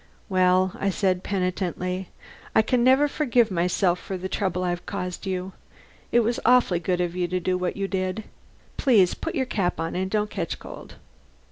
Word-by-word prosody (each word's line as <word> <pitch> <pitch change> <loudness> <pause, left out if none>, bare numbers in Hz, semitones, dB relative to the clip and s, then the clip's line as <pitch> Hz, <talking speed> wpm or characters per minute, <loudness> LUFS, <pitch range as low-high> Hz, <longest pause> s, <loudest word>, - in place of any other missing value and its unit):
"Well," 185 0 +3
I 200 - +1
said 185 -1 +1
penitently, 185 -1 -2 0.5
"I 220 - +6
can 240 +2 +1
never 265 +4 +5
forgive 245 -7 +2
myself 180 +1 +1
for 190 - -5
the 185 +1 -4
trouble 185 -2 -1
I've 175 -1 -3
caused 180 -2 -4
you. 185 0 -3 0.6
It 240 - +5
was 235 +1 0
awfully 245 -8 +4
good 180 +1 -1
of 175 -1 -1
you 180 -1 0
to 180 +1 -1
do 185 +1 0
what 180 +1 -2
you 195 0 -1
did. 190 +2 -2 0.5
Please 210 - +4
put - - -5
your 260 - +1
cap 195 -7 -1
on 165 - -2
and 190 +1 -1
don't 210 0 0
catch 170 -4 -3
cold." - - -11
185 Hz, 180 wpm, -25 LUFS, 180-210 Hz, 0.6 s, I